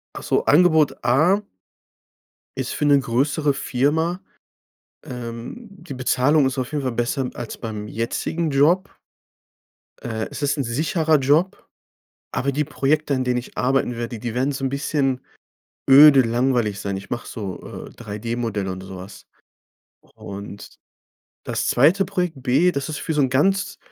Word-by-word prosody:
Ach - - -7
so, - - +1
Angebot 160 -2 +4
A 155 +12 +3 1.2
ist - - -3
für 150 - -2
'ne 145 -1 +6
größere 140 +4 0
Firma. 160 +7 0 0.8
Ähm, 120 - -7
die 185 -6 -11
Bezahlung 130 +3 +2
ist 130 +1 -4
auf 130 -1 -3
jeden 150 -2 -1
Fall 130 - -1
besser 125 +3 -1
als 120 - -7
beim 105 -2 -6
jetzigen 135 +9 -2
Job. 155 +7 +3 1.1
Äh. 110 -2 -4
Es - - -7
ist 140 0 +1
'n 140 - 0
sicherer 155 +6 +1
Job. 150 +8 +1 0.7
Aber 140 +2 -1
die 150 +3 0
Projekte, 150 0 0
an 130 - 0
denen 125 -1 0
ich 120 - -7
arbeiten 125 -1 +1
werde, 120 -1 -5
die 120 0 -5
wären 130 +3 +1
so 135 0 -5
'n 135 - +1
bisschen 135 -1 -1 0.7
öde, 140 0 +9
langweilig 120 -4 0
sein. 100 -1 -3
Ich 95 - -9
mache 120 - -4
so, 100 -6 -6 0.3
äh, - - -12
3D-Modell 110 -2 -4
und 95 0 -5
sowas. 95 +1 -10 0.9
Und 100 0 -9 0.8
das - - -2
zweite 170 +10 +4
Projekt 180 -7 -3
B. 140 +8 +3
Das 140 -1 -3
ist 155 - -4
für 165 - -3
so 150 - +1
'n 135 - +2
ganz 195 +10 +1
135 Hz, 155 wpm, -22 LUFS, 120-155 Hz, 1.2 s, öde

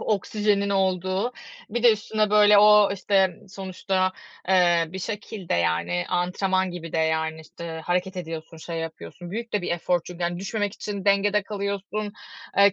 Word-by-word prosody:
oksijenin 205 0 0
olduğu, 190 +3 0 0.4
bir 235 +2 -2
de 240 -2 +8
üstüne, 215 0 -1
böyle, 210 0 +7
o, 210 -1 +7
işte, 190 -2 +2
sonuçta, 185 0 -1 0.4
eee, 175 -3 +4
bir 185 +4 -7
şekilde, 205 -2 -4
yani, 85 +1 0
antrenman 185 +1 0
gibi 165 -2 -7
de. - - 0
Yani, 160 0 0
işte, 160 +1 -8
hareket 180 +2 -1
ediyorsun, 165 -2 -6
şey 165 +1 -6
yapıyorsun. 165 - -7
Büyük 230 +4 -5
de 205 -3 0
bir - - -3
efor 175 +1 +1
çünkü. 180 0 -8
Yani 175 0 -1
düşmemek 205 +1 -2
için 200 -2 -5
dengede 205 +1 +3
kalıyorsun, 200 0 -4 0.4
eee, 200 0 +6
190 Hz, 155 wpm, -25 LUFS, 175-205 Hz, 0.4 s, de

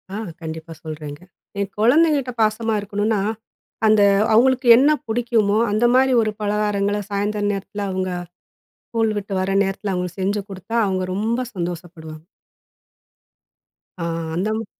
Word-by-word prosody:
ஆ, - - -3 0.2
கண்டிப்பா 160 0 -7
சொல்றேங்க. 150 -1 -7 0.4
என் 200 -1 -2
குழந்தைங்கட்ட 280 +2 +3
பாசமா 220 +1 +1
இருக்கணும்னா, 205 +1 -1 0.7
அந்த 215 -1 +5 0.3
அவங்களுக்கு 255 +2 +3
என்ன 280 +4 +5 0.2
பிடிக்குமோ 225 -3 +1
அந்த 215 +3 +2
மாரி 265 0 +4
ஒரு 215 -1 0
பலகாரங்களை 205 0 0
சாயந்தர 205 +1 -1
நேரத்தில, 200 +1 -5
அவங்க 185 0 -2 0.8
ஸ்கூல் 225 -2 0
விட்டு 200 0 -7
வர 190 - -1
நேரத்தில 195 +1 -3
அவங்களுக்கு 180 +1 -4
செஞ்சு 200 +2 0
கொடுத்தா 195 +4 -7
அவங்க 190 -1 -1
ரொம்ப 225 +5 -1
சந்தோஷப்படுவாங்க. 170 -3 -6 1.8
அ, - - -2 0.3
அந்த 195 +5 -1
மா 225 - -5
205 Hz, 125 wpm, -21 LUFS, 185-225 Hz, 1.8 s, அந்த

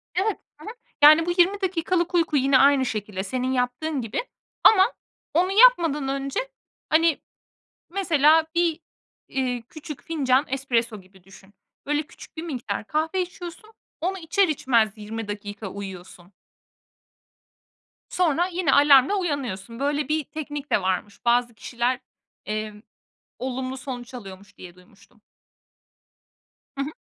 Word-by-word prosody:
Evet. 395 +3 0 0.2
Hı - - -11
hı. 440 - -6 0.3
Yani, 310 +2 +8
bu 350 - 0
20 390 +3 +3
dakikalık 355 -1 0
uyku 325 -4 +2
yine 270 0 +4
aynı 275 -1 +5
şekilde, 205 -4 -4
senin 255 +5 -2
yaptığın 260 +4 -1
gibi 225 - -3 0.4
ama 400 +1 +6 0.4
onu 360 +4 +2
yapmadan 345 - +5
önce, 275 0 -2 0.5
hani, 325 -1 +3 0.7
mesela 320 -4 +3
bir, 340 -2 +1 0.5
eee, 250 -3 -2
küçük 305 -2 -9
fincan 275 -4 +1
espresso 235 -5 -1
gibi 185 0 -22
düşün. 195 +1 -17 0.3
Böyle, 295 +1 0
küçük 310 - -15
bir 320 - -4
miktar 240 -10 -4
kahve 320 +5 0
içiyorsun, 360 +4 -8 0.3
onu 375 +3 -1
içer 345 +4 +2
içmez 235 -7 +2
20 220 +1 -6
dakika 205 0 -6
uyuyorsun. 185 -2 -9 1.8
Sonra 350 0 +1
yine 350 -5 0
alarmla 285 +4 +6
uyanıyorsun. 250 - -3
Böyle 285 0 0
bir 310 -1 +1
teknik 295 -1 -7
de - - +3
varmış. 190 +4 -3
Bazı 240 0 +2
kişiler, 240 +3 -2 0.5
emm, 215 0 -4 0.6
olumlu 260 +1 -4
sonuç 255 -1 -7
alıyormuş 200 -3 -11
diye 175 -1 -11
duymuştum. 195 +3 -23 1.5
Hı 275 - -3
hı. 285 - -4
275 Hz, 130 wpm, -24 LUFS, 225-325 Hz, 1.8 s, Yani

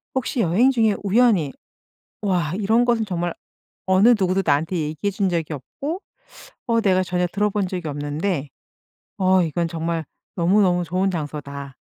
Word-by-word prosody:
혹시 260 0 -1
여행 210 +9 +3
중에 225 -5 +2
우연히 200 - +3 0.7
'와 180 -6 0
이런 220 +4 +2
것은 235 -2 +2
정말 175 -3 -2 0.5
어느 190 +4 +5
누구도 190 0 +2
나한테 155 +4 +1
얘기해 155 +4 -2
준 195 -1 0
적이 165 -2 -2
없고 285 - -6 0.7
어 230 -1 +2
내가 185 -3 +3
전혀 180 0 0
들어본 205 +1 0
적이 180 -3 -4
없는데 145 +2 -2 0.7
어 185 0 +4
이건 170 +1 -1
정말 165 0 -3 0.3
너무너무 180 0 +3
좋은 185 +3 0
장소다.' 140 -4 -6
180 Hz, 300 characters per minute, -22 LUFS, 160-205 Hz, 0.7 s, 어느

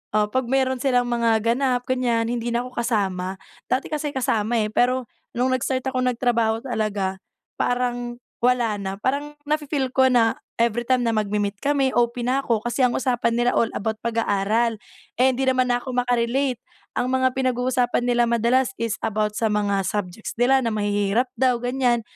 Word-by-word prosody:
ah, 210 0 +3
pag 260 +2 0
meron 260 -1 +1
silang 250 -3 +2
mga 230 -2 +2
ganap, 245 +1 +1
ganyan, 240 -3 +1
hindi 240 0 -2
na 235 - +1
ko 255 - -9
kasama. 195 -5 -1 0.3
Dati 255 - 0
kasi 300 -1 -2
kasama, 230 -2 0
eh, 215 - 0
pero 250 -1 +1 0.3
nung 255 +1 +2
nag-start 255 +1 -1
akong 255 -1 -1
nagtrabaho 230 -2 +1
talaga, 210 -5 -2 0.4
parang 245 -1 -1 0.3
wala 245 -3 +2
na. 195 0 -4
Parang 285 +5 -1
nafe-feel 295 -3 -1
ko 260 0 +5
na 230 -2 +3 0.2
every 235 0 +1
time 255 -1 +3
na 230 - +2
magmi-meet 205 -1 -1
kami, 280 -2 +2
OP 240 0 +1
na 260 +2 +1
ako 225 -3 0
kasi 240 +3 -1
ang 245 - +1
usapan 245 -3 +1
nila 240 +1 +2
all 230 - +2
about 220 +1 -2
pag-aaral. 225 0 +1 0.4
Eh, 260 +1 +4
hindi 265 +2 -1
naman 255 -1 +2
ako 245 +1 -2
maka-relate. 245 +1 +1 0.4
Ang 250 - 0
mga 260 0 +3
pinag-uusapan 250 -1 +1
nila 240 -1 +3
madalas 240 +3 +2
is 230 -2 -1
about 215 -1 0
sa 225 - +1
mga 200 -1 +1
subjects 205 0 -4
nila 265 +2 +4
na 225 - 0
mahihirap 205 +3 +1
daw, 255 -1 +4
gan'yan. 245 -1 +1
240 Hz, 170 wpm, -23 LUFS, 225-255 Hz, 0.4 s, ko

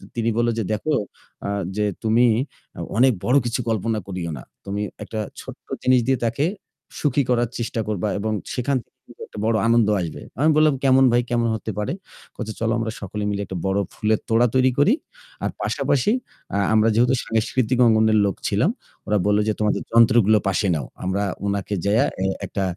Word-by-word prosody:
তিনি 115 0 0
বলল 120 0 +2
যে - - 0
"দেখো 150 +9 -1 0.5
আ - - -2 0.3
যে 105 - +2 0.2
তুমি 115 +3 +4 0.7
অনেক 130 +1 +6
বড় 130 +3 +4
কিছু 120 +2 -1
কল্পনা 110 0 0
করিও 90 -3 -4
না। - - -9 0.2
তুমি 100 +1 -3 0.2
একটা 110 +1 -5 0.2
ছোট্ট - - -11 0.2
জিনিস 130 -1 +5
দিয়ে 135 -1 +3
তাকে 120 +6 0 0.5
সুখী 140 -1 +2
করার 120 -1 +2
চেষ্টা 115 -1 -3
করবা 105 -1 -1
এবং 110 +1 -1 0.2
সেখান 130 +2 0
থেকে - - -44 0.3
একটা - - -13
বড় 115 0 +2
আনন্দ 115 -2 +4
আসবে। 85 - -5 0.2
আমি 155 +2 +4
বললাম 155 -2 +5 0.2
এমন 135 0 +6
ভাই 120 +1 +4
কেমন 120 -1 +1
হতে 110 0 -5
পারে? 105 - -1 0.4
বলছে 110 -2 -5
চলো 115 0 +1
আমরা 115 -1 -2
সকলে 105 +2 -4
মিলে 100 0 -2
একটা 95 - -5
বড় 95 +1 +1
ফুলের 110 -1 +1
তোড়া 115 +2 +4
তৈরি 130 0 +4
করি। 200 - +5 0.5
আর - - +1
পাশাপাশি 140 - +1 0.4
আ - - +2 0.2
আমরা 110 +1 +4
যেহেতু 125 +3 +4
সাংস্কৃতিক 115 +2 0
অঙ্গনের 110 -1 +4
লোক 100 - 0
ছিলাম, - - +2 0.4
ওরা 105 - +2
বলল 105 0 +3
যে - - +2
তোমাদের 105 -1 +1
যন্ত্রগুলো 115 -2 +5
পাশে 95 +1 +1
নাও। 70 -5 -3 0.2
আমরা 95 +2 0 0.2
উনাকে 100 0 -2
যাইয়া 105 +3 +3 0.4
একটা 100 - -3
110 Hz, 180 wpm, -22 LUFS, 105-120 Hz, 0.7 s, অনেক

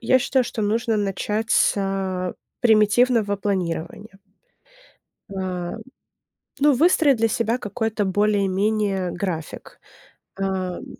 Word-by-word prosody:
я 260 +2 +3
считаю, 260 0 +1
что 220 - -4
нужно 225 +2 0
начать 210 +2 -2
с, - - +4
э, 190 -2 -2 0.3
примитивного 220 -1 +3
планирования. 195 +1 -4 1.1
Ам. 185 0 -4 0.8
Ну, 290 0 +5
выстроить 300 -2 +4
для 225 0 +2
себя 230 +1 0
какой-то 215 -1 -2
более-менее 200 -1 0
график, 175 -3 -5 0.6
эм. 190 -2 -3
205 Hz, 100 wpm, -22 LUFS, 190-225 Hz, 1.1 s, Ну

